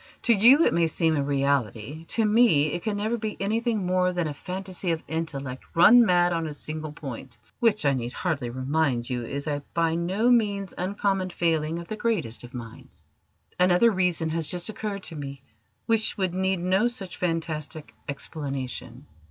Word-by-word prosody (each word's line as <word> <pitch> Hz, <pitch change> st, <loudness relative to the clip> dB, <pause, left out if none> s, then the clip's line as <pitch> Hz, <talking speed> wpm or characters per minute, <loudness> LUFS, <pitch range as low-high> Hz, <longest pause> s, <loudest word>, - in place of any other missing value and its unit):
To 235 Hz, -, +5 dB
you 245 Hz, +10 st, +6 dB
it -, -, +3 dB
may 170 Hz, -1 st, +3 dB
seem 160 Hz, 0 st, +1 dB
a 145 Hz, -, +1 dB
reality: 140 Hz, 0 st, -1 dB
to 225 Hz, +6 st, 0 dB
me 210 Hz, -10 st, +4 dB
it 175 Hz, -, -3 dB
can 210 Hz, 0 st, -2 dB
never 220 Hz, +3 st, -1 dB
be 215 Hz, -1 st, -4 dB
anything 220 Hz, 0 st, 0 dB
more 180 Hz, 0 st, +2 dB
than 175 Hz, -2 st, -1 dB
a 150 Hz, -, -3 dB
phantasy 185 Hz, +3 st, -5 dB
of 165 Hz, -1 st, -1 dB
intellect 140 Hz, -5 st, -4 dB
run 230 Hz, +9 st, +8 dB
mad 175 Hz, -4 st, +3 dB
on 165 Hz, -1 st, -1 dB
a 150 Hz, -, -5 dB
single 155 Hz, +1 st, -5 dB
point 135 Hz, -5 st, -8 dB, 0.2 s
which, 215 Hz, -7 st, +2 dB
I 140 Hz, -, +4 dB
need 120 Hz, -2 st, -3 dB
hardly 145 Hz, -6 st, -2 dB
remind 130 Hz, -1 st, -1 dB
you, 120 Hz, -1 st, -2 dB
is 140 Hz, +4 st, -4 dB
a 145 Hz, -2 st, -2 dB
by 165 Hz, -1 st, +2 dB
no 190 Hz, +8 st, +1 dB
means 205 Hz, -5 st, +1 dB
uncommon 195 Hz, 0 st, -1 dB
failing 165 Hz, -2 st, 0 dB
of 170 Hz, 0 st, -7 dB
the 215 Hz, -, -4 dB
greatest 210 Hz, -, -1 dB
of 120 Hz, +2 st, -11 dB
minds. 115 Hz, -2 st, -10 dB, 0.6 s
Another 180 Hz, +6 st, +5 dB
reason 180 Hz, -4 st, +1 dB
has 160 Hz, -1 st, -1 dB
just 175 Hz, +3 st, -2 dB
occurred 210 Hz, -2 st, -4 dB
to 165 Hz, -, -6 dB
me 140 Hz, -2 st, -7 dB, 0.4 s
which 225 Hz, -1 st, +1 dB
would 190 Hz, -3 st, 0 dB
need 190 Hz, -1 st, 0 dB
no 190 Hz, +6 st, +2 dB
such 205 Hz, -7 st, -6 dB
fantastic 160 Hz, -3 st, -3 dB, 0.2 s
explanation." 140 Hz, -3 st, -5 dB
170 Hz, 180 wpm, -26 LUFS, 145-200 Hz, 0.6 s, run